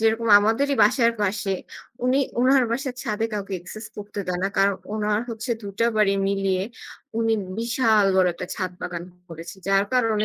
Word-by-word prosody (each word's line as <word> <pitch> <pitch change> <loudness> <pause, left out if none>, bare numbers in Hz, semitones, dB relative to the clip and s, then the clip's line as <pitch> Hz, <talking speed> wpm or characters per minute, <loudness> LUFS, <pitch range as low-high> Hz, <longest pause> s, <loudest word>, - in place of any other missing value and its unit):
যেরকম 225 +1 +1
আমাদেরই 225 +7 +1
বাসার 230 +2 +4
পাশে, 200 -1 0 0.5
উনি 255 +2 +3 0.2
উনার 260 0 +5
বাসার 260 +1 -2
ছাদে 220 0 -2
কাউকে 200 -1 -4
একসেস 215 +5 -9
করতে 205 0 -8
দেয় 180 0 -2
না। 195 - +2
কারণ 195 0 +3 0.2
উনার 210 0 0
হচ্ছে 225 +2 -5
২ 200 -1 -7
টা 230 - +3
বাড়ি 205 -2 +4 0.2
মিলিয়ে 195 -1 0 0.5
উনি 225 0 +2 0.3
বিশাল 225 -2 +3
বড় 185 -1 +5
একটা 180 - -6
ছাদ 185 -2 -3
বাগান 175 -1 -5 0.2
করেছে। 165 +2 -9
যার 195 0 +4
কারণে 225 -4 +2
210 Hz, 170 wpm, -24 LUFS, 195-230 Hz, 0.5 s, উনার